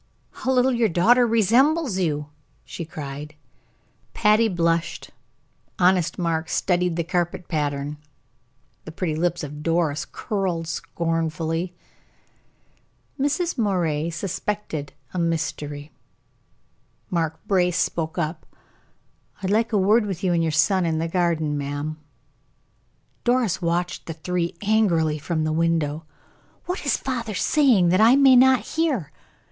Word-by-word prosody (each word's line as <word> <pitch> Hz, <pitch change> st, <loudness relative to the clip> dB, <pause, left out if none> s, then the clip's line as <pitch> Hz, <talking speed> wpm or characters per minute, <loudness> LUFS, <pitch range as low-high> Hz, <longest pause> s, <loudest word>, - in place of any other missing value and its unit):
"How 260 Hz, -, -3 dB
little 255 Hz, 0 st, +3 dB
your 235 Hz, -2 st, +2 dB
daughter 235 Hz, +8 st, +4 dB
resembles 235 Hz, -, +3 dB
you!" 150 Hz, -4 st, -1 dB, 0.4 s
she 170 Hz, -, -6 dB
cried. 150 Hz, -1 st, -7 dB, 0.8 s
Patty 215 Hz, +2 st, +4 dB
blushed, 170 Hz, -3 st, -1 dB, 0.7 s
honest 180 Hz, -2 st, +2 dB
Mark 165 Hz, -2 st, -1 dB
studied 180 Hz, -2 st, +1 dB
the 170 Hz, -, -1 dB
carpet 175 Hz, +1 st, -2 dB
pattern, 145 Hz, -2 st, -2 dB, 0.9 s
the 160 Hz, -, -9 dB
pretty 165 Hz, -1 st, -2 dB
lips 175 Hz, +1 st, -1 dB
of 150 Hz, 0 st, -7 dB
Doris 165 Hz, -2 st, 0 dB
curled 185 Hz, -6 st, -3 dB
scornfully. 165 Hz, +1 st, -2 dB, 1.4 s
Mrs. 290 Hz, +2 st, 0 dB
Moray 170 Hz, -7 st, 0 dB
suspected 170 Hz, -2 st, -4 dB, 0.2 s
a 185 Hz, -, -2 dB
mystery. 150 Hz, -3 st, -3 dB, 1.2 s
Mark 160 Hz, -2 st, -1 dB
Brace 180 Hz, -3 st, +2 dB
spoke 165 Hz, -2 st, -1 dB
up: 160 Hz, -1 st, -3 dB, 1.0 s
"I'd 190 Hz, -, 0 dB
like 225 Hz, +3 st, +2 dB
a 215 Hz, -, +2 dB
word 210 Hz, +3 st, +3 dB
with 190 Hz, -1 st, -5 dB
you 180 Hz, -2 st, +2 dB
and 170 Hz, -, +2 dB
your 165 Hz, -1 st, 0 dB
son 185 Hz, +5 st, +3 dB
in 165 Hz, -2 st, 0 dB
the 165 Hz, +1 st, -1 dB
garden, 165 Hz, -4 st, 0 dB
ma'am." 145 Hz, +2 st, -4 dB, 1.2 s
Doris 240 Hz, -7 st, +1 dB
watched 175 Hz, +1 st, -2 dB
the 165 Hz, -, -4 dB
three 170 Hz, +2 st, -2 dB
angrily 170 Hz, -8 st, +2 dB
from 155 Hz, +2 st, -2 dB
the 155 Hz, 0 st, 0 dB
window. 160 Hz, -1 st, 0 dB, 0.6 s
"What 360 Hz, -5 st, -4 dB
is -, -, +3 dB
father 235 Hz, -5 st, -4 dB
saying 240 Hz, -, +3 dB
that 185 Hz, +4 st, +3 dB
I 230 Hz, +4 st, +7 dB
may 275 Hz, -2 st, +6 dB
not 260 Hz, 0 st, +6 dB
hear? 275 Hz, -, -1 dB
175 Hz, 125 wpm, -23 LUFS, 160-210 Hz, 1.4 s, I